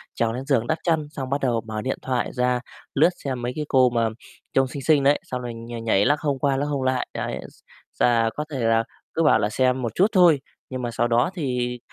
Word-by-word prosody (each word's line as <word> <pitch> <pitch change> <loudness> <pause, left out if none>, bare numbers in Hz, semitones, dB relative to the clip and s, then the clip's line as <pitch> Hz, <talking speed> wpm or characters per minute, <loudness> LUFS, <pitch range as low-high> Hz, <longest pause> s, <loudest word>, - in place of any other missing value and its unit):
trèo 115 -1 0
lên 130 +3 -5
giường 130 -5 +1
đắp 155 - +1
chăn, 160 -4 +1
xong 135 -3 -6
bắt 140 +1 -1
đầu 120 -3 +1
mở 110 -1 -5
điện 130 +4 -2
thoại 125 -2 -1
ra, 125 0 +1 0.3
lướt 155 +5 +5
xem 130 -3 -3
mấy 120 +1 -2
cái 150 - -3
cô 130 -3 +4
mà 115 -1 +1 0.4
trông 135 0 +3
xinh 140 +2 -7
xinh 150 -2 +4
đấy, 140 +2 +4
xong 125 -1 -5
rồi 120 -1 -5
nh 115 0 -7
nhảy, 105 -3 +3
lắc 145 +1 +3
hông 145 -3 -1
qua 135 0 +1
lắc 140 - 0
hông 145 -2 -2
lại. 130 -1 0
Đấy, - - -3
s - - -24 0.4
sà 115 -2 +3
có 150 - -3
thể 135 - -3
là 115 -1 +3 0.3
cứ 165 - +1
bảo 150 -7 +5
là 105 -1 +1
xem 130 +3 +1
một 115 -3 -3
chút 190 - +5
thôi, 175 -8 +5 0.3
nhưng 130 -1 -4
mà 120 -1 -3
sau 120 +1 +1
đó 120 +4 +2
thì, 125 -7 -2
130 Hz, 250 wpm, -24 LUFS, 120-140 Hz, 0.4 s, lướt